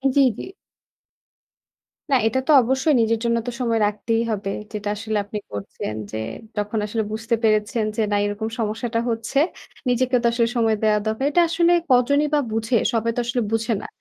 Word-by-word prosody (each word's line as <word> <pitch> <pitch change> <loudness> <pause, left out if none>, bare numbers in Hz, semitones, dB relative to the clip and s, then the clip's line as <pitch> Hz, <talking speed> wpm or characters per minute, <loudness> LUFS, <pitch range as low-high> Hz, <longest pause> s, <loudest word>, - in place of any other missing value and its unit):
জি, 280 - +6 0.2
জি। - - -6 1.7
না 270 - +5
এটা 230 +4 +1
তো - - +4
অবশ্যই 265 +5 +1
নিজের 225 0 +1
জন্য 235 0 +2
তো - - -1
সময় 230 -2 +1
রাখতেই 225 +2 -1
হবে, 200 -2 -2 0.2
যেটা 210 -1 -4
আসলে 215 +1 -3
আপনি 210 +1 -5
করছেন 100 +1 -5 0.2
যে, 110 - -4 0.4
যখন 210 +2 -2
আসলে 220 +1 -2
বুঝতে 225 +2 -1
পেরেছেন 215 +1 +2
যে, 225 - 0
"না 205 - +3
এরকম 205 +2 -3
সমস্যাটা 225 +2 -1
হচ্ছে, 230 +4 -1 0.5
নিজেকেও 250 +1 +2
তো - - +4
আসলে 235 -1 +2
সময় 225 -2 +3
দেওয়া 215 -1 +3
দরকার!" 220 +5 -1
এটা 350 - +4
আসলে 340 +1 +3 0.2
কজনই 280 +4 +4
বা 300 - +4
বুঝে! 225 +2 +1 0.2
সবাই 230 0 +1
তো - - -1
আসলে 240 +1 -1
বুঝে 225 +1 0
না। - - -7
225 Hz, 180 wpm, -22 LUFS, 215-245 Hz, 1.7 s, জি